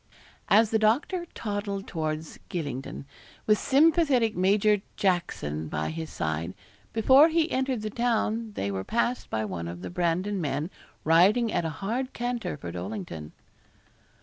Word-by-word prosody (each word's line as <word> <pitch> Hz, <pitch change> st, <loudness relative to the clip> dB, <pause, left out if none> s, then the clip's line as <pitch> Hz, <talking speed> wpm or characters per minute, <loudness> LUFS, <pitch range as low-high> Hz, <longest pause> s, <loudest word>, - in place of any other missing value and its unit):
As 220 Hz, +1 st, +5 dB
the 220 Hz, -, +3 dB
doctor 290 Hz, -, +1 dB
toddled 205 Hz, -2 st, -3 dB
towards 155 Hz, -2 st, -4 dB
Gylingden, 140 Hz, -5 st, -4 dB, 0.4 s
with 215 Hz, -1 st, +4 dB
sympathetic 280 Hz, -6 st, +3 dB
Major 200 Hz, +2 st, +3 dB, 0.2 s
Tackson 125 Hz, -, -1 dB
by 75 Hz, +1 st, -2 dB
his 160 Hz, 0 st, -5 dB
side, 80 Hz, +2 st, -3 dB, 0.4 s
before 265 Hz, +8 st, +6 dB
they 325 Hz, -1 st, +3 dB
entered 260 Hz, -5 st, -1 dB
the 215 Hz, -, -3 dB
town 230 Hz, -1 st, 0 dB
they 100 Hz, -, -2 dB
were 95 Hz, -1 st, -3 dB
passed 235 Hz, -, -1 dB
by 110 Hz, 0 st, -1 dB
one 90 Hz, -4 st, -4 dB
of 85 Hz, +1 st, -7 dB
the -, -, -5 dB
Brandon 180 Hz, +3 st, 0 dB
men 150 Hz, +3 st, -2 dB, 0.3 s
riding 195 Hz, +9 st, +4 dB
at 170 Hz, -, 0 dB
a -, -, 0 dB, 0.2 s
hard 255 Hz, +5 st, -2 dB
canter 240 Hz, -8 st, -3 dB
for 85 Hz, -, -7 dB
Dollington. 90 Hz, -4 st, -6 dB
195 Hz, 145 wpm, -27 LUFS, -, 0.4 s, before